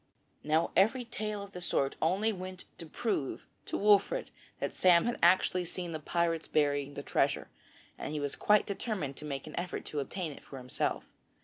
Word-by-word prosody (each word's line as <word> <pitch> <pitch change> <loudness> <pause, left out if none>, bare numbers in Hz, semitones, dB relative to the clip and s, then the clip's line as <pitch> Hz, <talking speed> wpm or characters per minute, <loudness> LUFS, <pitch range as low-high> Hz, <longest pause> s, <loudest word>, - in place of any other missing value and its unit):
Now 155 +2 +2
every 235 +6 +4
tale 210 -2 -4
of 200 - -10
the 180 - -7
sort 140 -5 0
only 195 +7 +2
went 185 -1 -7 0.2
to 165 - -8
prove 155 - -2 0.2
to - - -1
Wolfert 210 - +3 0.3
that - - -2
Sam 175 -2 +5
had 240 - -1
actually 180 +1 +4
seen 175 0 -4
the 155 - -3
pirates 165 +1 0
burying 145 -1 +1
the - - -5
treasure, - - +1 0.5
and - - -4
he 150 - -2
was 145 -1 -2
quite 210 0 +4
determined 195 - -3
to 150 - -7
make 140 -2 -4
an 155 - -8
effort 180 0 -4
to 150 - -3
obtain 160 +4 -3
it - - -12
for 135 - -10
himself. 125 -1 -2
175 Hz, 190 wpm, -32 LUFS, 150-200 Hz, 0.5 s, Sam